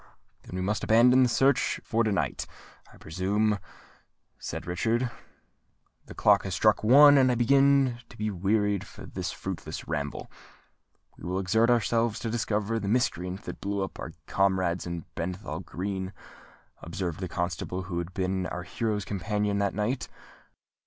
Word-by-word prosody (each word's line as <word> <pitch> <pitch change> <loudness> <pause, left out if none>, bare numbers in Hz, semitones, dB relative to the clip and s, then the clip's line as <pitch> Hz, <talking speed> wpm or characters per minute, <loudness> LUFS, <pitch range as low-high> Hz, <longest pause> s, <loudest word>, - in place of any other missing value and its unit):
"Then - - -10
we 90 - -2
must 105 +2 -1
abandon 125 +3 +6
the 125 - +4
search 135 +2 +2
for 115 0 +1
to 110 - +1
night, 100 - -1 0.4
I - - -17
presume," 100 +5 0 0.8
said - - -6
Richard. 115 +8 0 1.0
"The - - -10
clock 100 -1 +4
has 95 -2 -3
struck 110 +2 +3
one, 145 +5 +8
and 130 -1 +4
I - - +1
begin 135 0 +4
to 115 - -14
be 105 0 -1
wearied 100 +1 +1 0.2
of - - -10
this - - -3
fruitless - - -6
ramble." 75 -2 -3 0.9
"We - - -14
will 90 - -1
exert 110 +5 +2
ourselves 115 -1 +2
to 115 - -2
discover 110 -1 -1
the 100 - -4
miscreant 95 -5 -1
that - - -8
blew 100 0 -1
up 95 - -7
our - - -6
comrades 95 -3 +1
in 85 -2 -5
Bethnal 90 -2 -4
Green," 95 +1 -4 0.7
observed 85 0 -4
the 95 - -3
constable 90 +2 -3
who 85 -1 -3
had 85 +1 -5
been 95 -1 -1
our 90 - -5
hero's 105 +2 -2
companion 105 +1 -1
that 100 -1 0
night. 115 +5 -1
100 Hz, 160 wpm, -28 LUFS, 90-115 Hz, 1.0 s, one